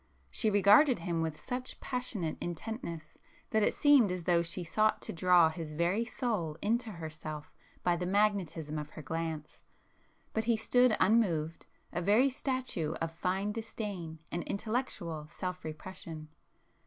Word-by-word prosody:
She 220 Hz, -, +1 dB
regarded 210 Hz, +7 st, +6 dB
him 170 Hz, -1 st, -2 dB
with 160 Hz, -1 st, -2 dB
such 255 Hz, 0 st, -5 dB
passionate 230 Hz, -, -3 dB
intentness 170 Hz, -3 st, -5 dB, 0.3 s
that 220 Hz, -2 st, +3 dB
it -, -, +2 dB
seemed 280 Hz, -9 st, +6 dB
as 180 Hz, -1 st, -3 dB
though 170 Hz, -1 st, +3 dB
she 170 Hz, +2 st, -4 dB
sought 215 Hz, +6 st, +2 dB
to -, -, -5 dB
draw 175 Hz, -1 st, +5 dB
his 160 Hz, -1 st, -6 dB
very 175 Hz, +8 st, +1 dB
soul 210 Hz, -, -2 dB
into 225 Hz, +2 st, 0 dB
herself 155 Hz, -2 st, -7 dB, 0.3 s
by 175 Hz, -, +3 dB
the 180 Hz, +1 st, -2 dB
magnetism 185 Hz, -7 st, +1 dB
of 150 Hz, 0 st, -6 dB
her 155 Hz, -, -10 dB
glance,—but 160 Hz, +7 st, -6 dB
he 230 Hz, -1 st, +3 dB
stood 245 Hz, +1 st, +4 dB
unmoved, 170 Hz, -7 st, +2 dB, 0.3 s
a 175 Hz, -, -1 dB
very 215 Hz, +9 st, +5 dB
statue 255 Hz, -, -2 dB
of 165 Hz, 0 st, -3 dB
fine 190 Hz, +4 st, -1 dB
disdain 205 Hz, -7 st, -5 dB
and 175 Hz, -, -1 dB
intellectual 200 Hz, -9 st, -3 dB
self 180 Hz, +2 st, -5 dB
repression. 155 Hz, -1 st, -7 dB
180 Hz, 140 wpm, -32 LUFS, 160-220 Hz, 0.3 s, regarded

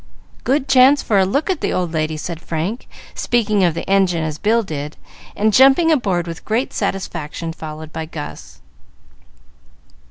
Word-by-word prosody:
"Good 270 Hz, +1 st, +1 dB
chance 265 Hz, +2 st, +5 dB
for 205 Hz, -3 st, +2 dB
a 190 Hz, -, +3 dB
look 280 Hz, +10 st, 0 dB
at 360 Hz, -, -3 dB
the -, -, 0 dB
old 175 Hz, -2 st, -1 dB
lady," 155 Hz, 0 st, -1 dB
said 165 Hz, +1 st, -6 dB
Frank, 170 Hz, +10 st, -4 dB, 0.3 s
speaking 215 Hz, -4 st, +1 dB
of 170 Hz, -3 st, +2 dB
the -, -, -5 dB
engine 190 Hz, -4 st, +2 dB
as 155 Hz, -1 st, -4 dB
Bill 225 Hz, +2 st, +2 dB
did, 150 Hz, -4 st, -6 dB, 0.4 s
and 215 Hz, +1 st, +1 dB
jumping 270 Hz, +8 st, +6 dB
aboard 195 Hz, -, +1 dB
with 165 Hz, -1 st, -7 dB
great 230 Hz, +5 st, -1 dB
satisfaction, 165 Hz, -5 st, -3 dB
followed 155 Hz, 0 st, -8 dB
by 160 Hz, -, -4 dB
Gus. 145 Hz, -, -9 dB
185 Hz, 160 wpm, -19 LUFS, 160-230 Hz, 0.4 s, jumping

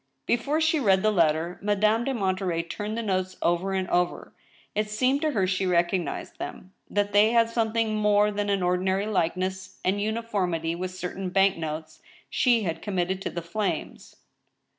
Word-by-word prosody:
Before 275 Hz, +6 st, +1 dB
she 315 Hz, -1 st, +2 dB
read 195 Hz, -6 st, +3 dB
the 215 Hz, -, +4 dB
letter. 165 Hz, -2 st, +1 dB
Madame 215 Hz, +3 st, +2 dB
de 270 Hz, -, 0 dB
Monterey 185 Hz, -5 st, -1 dB
turned 210 Hz, +6 st, -5 dB
the 230 Hz, -, -2 dB
notes 185 Hz, -2 st, -1 dB
over 175 Hz, +3 st, 0 dB
and 190 Hz, -1 st, -1 dB
over. 175 Hz, 0 st, 0 dB, 0.4 s
It 210 Hz, 0 st, -1 dB
seemed 255 Hz, +6 st, +1 dB
to 310 Hz, -, +2 dB
her 195 Hz, -5 st, +2 dB
she 185 Hz, 0 st, 0 dB
recognized 175 Hz, -2 st, -1 dB
them; 190 Hz, -, -7 dB, 0.2 s
that 205 Hz, 0 st, 0 dB
they 210 Hz, +3 st, +5 dB
had 230 Hz, -1 st, +4 dB
something 225 Hz, -1 st, 0 dB
more 210 Hz, 0 st, +3 dB
than 205 Hz, 0 st, -2 dB
an 200 Hz, -2 st, +1 dB
ordinary 190 Hz, +2 st, +1 dB
likeness 185 Hz, -1 st, -2 dB
and 200 Hz, +2 st, +1 dB
uniformity 200 Hz, -7 st, -1 dB
with 180 Hz, +2 st, -3 dB
certain 185 Hz, +1 st, -5 dB
bank 195 Hz, +1 st, +3 dB
notes 160 Hz, -, -6 dB, 0.3 s
she 240 Hz, -4 st, +3 dB
had 165 Hz, -3 st, -3 dB
committed 190 Hz, -1 st, -1 dB
to -, -, -2 dB
the 170 Hz, -, -5 dB
flames. 200 Hz, +5 st, -4 dB
195 Hz, 170 wpm, -26 LUFS, 180-215 Hz, 0.4 s, they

